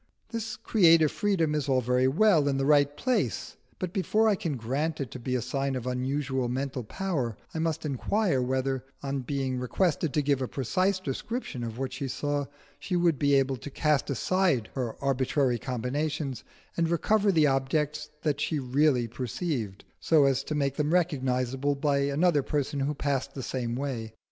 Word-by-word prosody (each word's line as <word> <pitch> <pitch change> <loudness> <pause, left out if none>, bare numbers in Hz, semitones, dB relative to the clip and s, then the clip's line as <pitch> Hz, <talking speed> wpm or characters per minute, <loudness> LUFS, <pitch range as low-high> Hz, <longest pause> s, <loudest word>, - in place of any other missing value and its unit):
This 225 -2 -4
creative 165 -7 +5
freedom 180 -7 +1
is 150 -2 -1
all 130 -1 +4
very 125 +1 +2
well 160 0 +4
in 135 -1 +1
the 135 - 0
right 145 0 +4
place, 255 -1 -1 0.2
but 185 -2 -4
before 215 +3 +2
I 215 - +5
can 165 -7 -2
grant 140 +8 -2
it 135 -5 -4
to 130 - -7
be 125 +1 -2
a 125 - -1
sign 135 +1 -1
of 125 -2 -4
unusual 130 0 -1
mental 130 0 -3
power, 135 - -2 0.2
I 160 - -3
must 160 -1 -1
inquire 155 - +1
whether, 130 0 -1 0.2
on 140 0 -2
being 130 -1 -2
requested 155 +4 0
to 150 - +2
give 140 -1 +1
a 130 - -1
precise 185 - 0
description 170 - -4
of 115 -1 -5
what 130 0 -3
she 135 +1 -3
saw, 145 +1 -2 0.3
she 180 - -3
would 170 -4 +2
be 140 -1 +3
able 135 -1 +2
to 145 - -8
cast 150 +1 +1
aside 150 - +1
her 125 -4 -3
arbitrary 130 -2 +1
combinations 135 +2 -2 0.3
and 165 -1 +1
recover 205 +4 +2
the 160 -4 +4
objects 145 +3 0 0.3
she 150 +2 -1
really 130 -1 +2
perceived 120 - -4 0.2
so 155 -3 +4
as 135 0 +2
to 155 - -3
make 140 -2 0
them 150 +3 +1
recognisable 135 -4 0
by 140 0 +1
another 145 +3 +2
person 145 +1 -2
who 140 +2 -1
passed 140 -2 -2
the 135 - -5
same 120 -2 -2
way. 120 -5 -4
140 Hz, 180 wpm, -28 LUFS, 130-155 Hz, 0.3 s, creative